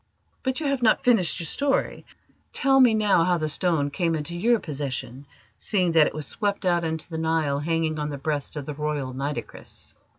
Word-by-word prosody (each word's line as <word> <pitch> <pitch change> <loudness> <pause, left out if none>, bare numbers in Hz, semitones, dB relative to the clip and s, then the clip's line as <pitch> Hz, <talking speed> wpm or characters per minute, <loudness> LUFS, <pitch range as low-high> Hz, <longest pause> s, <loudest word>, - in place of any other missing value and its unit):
But 260 +1 -1
you 315 - -4
have 275 -2 0
not 225 -2 +3
finished 210 -9 +3
your 170 - -2
story. 275 - -1 0.5
Tell 270 0 +3
me 245 -4 +6
now 210 -5 +3
how 180 0 +2
the 155 -1 -2
stone 155 -3 0
came 165 +1 0
into 160 +3 -4
your 230 +7 +3
possession, 140 -3 -5 0.3
seeing 185 -5 +1
that 160 -2 +5
it - - -5
was 155 -1 -3
swept 205 +4 -2
out 175 -1 +2
into 160 -1 -3
the 160 -2 -5
Nile 160 -3 0
hanging 160 0 -1
on 150 0 -2
the 145 - -5
breast 145 +1 -3
of 145 -2 -5
the 150 - -5
Royal 145 -3 -3
Nitocris." 140 +3 -6
160 Hz, 200 wpm, -25 LUFS, 150-195 Hz, 0.5 s, me